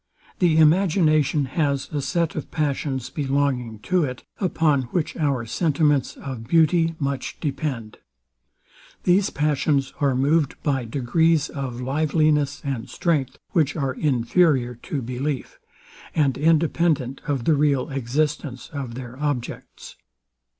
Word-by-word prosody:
The 170 -4 +3
imagination 155 -3 +3
has 140 0 -1
a 145 - -1
set 170 +2 0
of 155 - -5
passions 140 -5 -2
belonging 135 -5 -1
to 180 +5 +1
it, 125 -3 -4 0.2
upon 155 -8 +1
which 165 +1 -2
our 140 -7 0
sentiments 150 +1 +1
of 125 -5 -7
beauty 165 +1 +3
much 140 -3 -3
depend. 135 -7 -4 1.0
These 185 +2 +3
passions 145 -2 0
are 140 -2 +2
moved 145 +2 +2
by 135 -4 0
degrees 145 +6 +1
of 130 -4 -5
liveliness 150 +1 +1
and 135 -5 -3
strength, 140 -7 -1
which 155 -5 +1
are 135 -5 -1
inferior 130 -1 +2
to 135 +3 -5
belief, 130 +3 -4 0.6
and 145 -4 +2
independent 155 -3 +1
of 135 -5 -1
the 160 - +4
real 140 -2 +1
existence 135 +1 -2
of 135 -5 -5
their 125 0 -8
objects. 145 -5 -4
145 Hz, 120 wpm, -23 LUFS, 130-155 Hz, 1.0 s, the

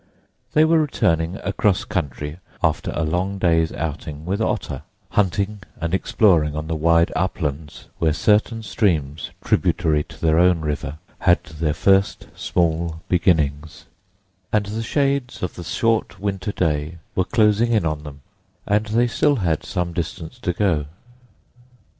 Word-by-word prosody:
They 155 +1 +5
were 165 0 +4
returning 85 - +1
across 100 -3 +1
country 75 -1 -3 0.2
after - - +1
a 85 - 0
long 90 +5 -1
day's 80 -3 +2
outing 75 -1 -5
with 100 +4 -1
Otter, - - -2 0.3
hunting 100 +1 0 0.2
and 85 0 -2
exploring 85 -6 +3
on 75 0 -3
the 80 +1 -2
wide 85 +2 +3
uplands 80 -4 -3
where 80 -2 +3
certain 110 +7 +2
streams 80 - 0 0.2
tributary 75 -2 +2
to - - -14
their 80 0 +3
own 90 -2 +4
River 75 -1 -3 0.2
had 85 -2 +3
their 75 0 -2
first 95 +3 +2
small 85 -1 -1
beginnings; 75 -4 +1 0.7
and 105 -1 +2
the 105 +3 -4
shades 135 0 -1
of 90 - -2
the 90 - -8
short 115 -1 0
winter 100 0 -2
day 80 -2 -1 0.2
were 95 - +2
closing 110 +3 +3
in 110 -7 +2
on 75 -2 -1
them, 75 -1 -10 0.4
and 105 +1 +1
they 115 +3 +2
had 120 - -3
still 145 +2 +2 0.2
some 90 -2 -3
distance 80 -1 -5
to 90 - -1
go. 85 -6 0
85 Hz, 145 wpm, -22 LUFS, 80-105 Hz, 0.7 s, They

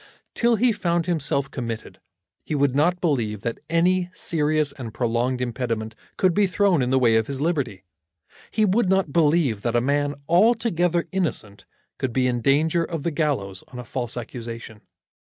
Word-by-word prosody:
Till 235 0 +2
he 240 +3 +3
found 170 -5 0
himself 140 -5 -1
committed, 115 -4 -6 0.4
he 155 - -3
would 140 -2 +2
not 175 +5 +2
believe 115 - -1
that 115 0 -3
any 180 +2 +2
serious 155 -3 0
and 120 -5 -8
prolonged 120 +1 0
impediment 115 -3 -3 0.2
could 185 -2 +3
be 205 +1 +3
thrown 185 -4 +2
in 125 - 0
the 130 - +3
way 115 -3 +4
of 110 - 0
his 140 -1 -4
liberty. 140 - -1 0.7
He 215 - +2
would 200 0 +2
not 190 -6 +1
believe 150 -9 +2
that 120 +1 -1
a - - +5
man 145 +3 0
altogether 175 -3 +2
innocent 155 - -3 0.3
could 130 -3 -2
be 130 0 +2
in 120 -1 0
danger 155 +6 +2
of 165 -3 -4
the 170 - 0
gallows 135 - -2
on 125 - -11
a 125 - -7
false 120 -2 -4
accusation. 115 -2 -7
145 Hz, 175 wpm, -23 LUFS, 120-175 Hz, 0.7 s, a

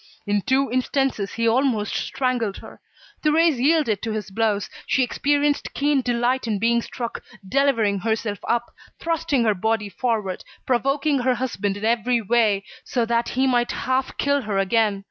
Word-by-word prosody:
In 205 0 +1
two 265 +3 +1
instances 255 -5 0
he 230 0 0
almost 230 -3 +1
strangled 245 -6 -1
her. - - -13 0.4
Thérèse 310 -2 +3
yielded 275 - +2
to 225 - -3
his 210 -3 -5
blows. 210 -1 0 0.2
She 265 - +2
experienced 290 +3 0
keen 285 -1 +2
delight 245 +1 0
in 215 -2 0
being 235 +3 +2
struck, 235 0 -6 0.3
delivering 230 -5 +2
herself 220 0 -2
up, 235 0 0 0.3
thrusting 330 -6 0
her 215 -2 +3
body 210 +2 -1
forward, 210 -3 -2 0.2
provoking 275 +3 +1
her 255 0 +1
husband 225 -5 -2
in 210 - -4
every 235 +1 +2
way, 215 -2 +2 0.2
so 240 -3 -1
that 235 0 0
he 265 - +3
might 245 -2 +1
half 260 +1 -1
kill 285 0 +1
her 210 -4 -2
again. 200 +1 +2
235 Hz, 160 wpm, -23 LUFS, 215-265 Hz, 0.4 s, Thérèse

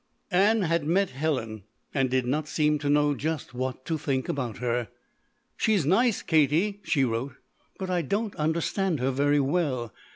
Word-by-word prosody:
Ann 205 +4 +4
had 165 -2 +1
met 190 +4 +2
Helen 130 -6 -2 0.3
and 135 -2 +1
did 130 -1 +1
not 150 +4 -1
seem 150 -1 +1
to 145 0 -2
know 145 0 +3
just 155 -1 -3
what 130 +1 -4
to 160 -2 -2
think 135 -3 -1
about 125 -6 -3
her. 120 -1 -1 0.7
"She's 205 -8 +2
nice, 220 - +2
Katie," 160 +6 +2
she 140 -5 +1
wrote, 125 +2 -2 0.4
"but 190 -1 -4
I 180 -1 +1
don't 205 - -2
understand 165 +2 0
her 130 +2 +1
very 145 +2 +2
well. 135 - 0
150 Hz, 165 wpm, -27 LUFS, 130-175 Hz, 0.7 s, Ann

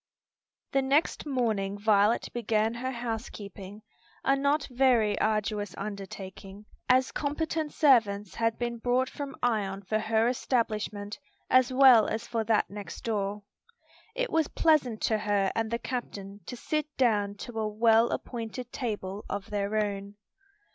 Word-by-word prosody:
The 270 - +2
next 280 +3 +1
morning 220 -7 0
Violet 210 +1 +3
began 225 -1 +1
her 250 +2 -3
housekeeping; 215 -4 -6 0.4
a 270 - +3
not 280 +2 +1
very 240 -5 +3
arduous 210 -2 -1
undertaking, 195 0 -7 0.2
as 255 +1 +4
competent 310 +1 -2
servants 210 -9 +3
had 230 -1 0
been 240 -1 -3
brought 250 +2 +1
from 285 0 -6
Ion 200 -5 0
for 215 +3 0
her 220 +1 +2
establishment 215 -4 -1 0.3
as 255 -1 +5
well 255 -4 +7
as 225 +1 -3
for 230 -2 -1
that 220 -1 +2
next 205 -1 -8
door. 205 -2 -2 0.7
It - - -1
was 320 -2 +2
pleasant 275 -9 +2
to 220 -1 +1
her 205 -2 +1
and 225 -1 -1
the 235 - -1
captain 205 -6 -6
to 245 - -6
sit 305 +4 -2
down 210 -5 +2
to 225 +2 -6
a 215 - 0
well 225 +2 +4
appointed 240 +1 -5
table 210 -5 -4
of 200 0 -5
their 205 0 -1
own. 200 -1 -2
225 Hz, 140 wpm, -28 LUFS, 205-250 Hz, 0.7 s, well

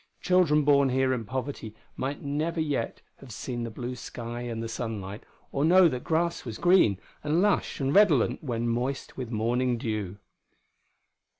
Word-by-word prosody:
Children 175 -5 +3
born 140 -1 +4
here 130 0 +2
in 115 -3 -3
poverty 130 -2 -5 0.2
might 140 +2 -4
never 155 +4 -2
yet 145 -7 -2
have 135 -3 -13
seen 120 +4 -5
the 115 - -3
blue 120 +3 -5
sky 120 -1 -6
and 115 -2 -4
the - - -3
sunlight, 110 -3 -5 0.3
or 140 - 0
know 180 +3 +7
that 125 -6 -3
grass 170 +1 0
was 115 -4 -6
green 175 - +4 0.3
and 150 +3 +1
lush 205 +1 +1
and 135 0 0
redolent 155 - +4
when 120 -4 -2
moist 125 +4 -2
with 125 -3 -5
morning 120 +2 0
dew.... 105 -4 -3
130 Hz, 165 wpm, -27 LUFS, 115-150 Hz, 0.3 s, know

